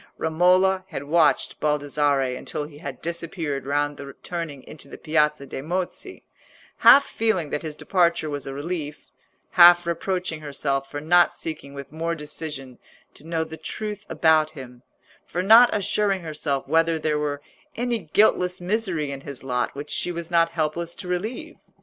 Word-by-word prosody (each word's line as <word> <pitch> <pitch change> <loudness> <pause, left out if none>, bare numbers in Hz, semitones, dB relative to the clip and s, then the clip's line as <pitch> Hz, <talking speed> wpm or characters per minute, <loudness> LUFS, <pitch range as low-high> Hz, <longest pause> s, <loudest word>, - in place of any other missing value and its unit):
Romola 180 +4 +3
had 140 - -6
watched 155 +1 +2
Baldassarre 145 -3 +1
until 150 - -5
he 145 0 -11
had 140 -4 -8
disappeared 165 -5 -3
round 145 0 0
the 140 -1 -9
turning 165 -6 -5
into 150 -2 -9
the - - -10
Piazza 150 -2 +1
de' 135 - -6
Mozzi, 175 +5 -4 0.5
half 280 - +8
feeling 190 -10 -1
that 150 - -2
his 155 -2 -6
departure 170 -2 +1
was 145 -2 -5
a 135 - -5
relief, 150 0 -5 0.5
half 175 -1 +8
reproaching 170 -1 -2
herself 140 -2 -2
for 145 - -5
not 175 +3 +4
seeking 140 -3 -6
with 140 0 -8
more 165 +2 -2
decision 150 -4 -7 0.3
to - - -14
know 165 -1 0
the 160 0 -9
truth 210 +2 -5
about 155 -1 +3
him, 130 -5 -11 0.4
for 180 - -3
not 230 +5 +8
assuring 200 -2 0
herself 150 -4 -3
whether 165 +2 +2
there 155 -1 0
were 145 -1 -2 0.4
any 240 -1 -1
guiltless 180 +1 +2
misery 180 -6 -1
in 135 -1 -6
his 140 -2 -8
lot 125 -1 -2
which 145 +1 -7
she 175 - -1
was 170 0 -6
not 165 -1 +4
helpless 165 +1 -2
to 185 - -8
relieve. 220 - -4
160 Hz, 160 wpm, -24 LUFS, 145-175 Hz, 0.5 s, half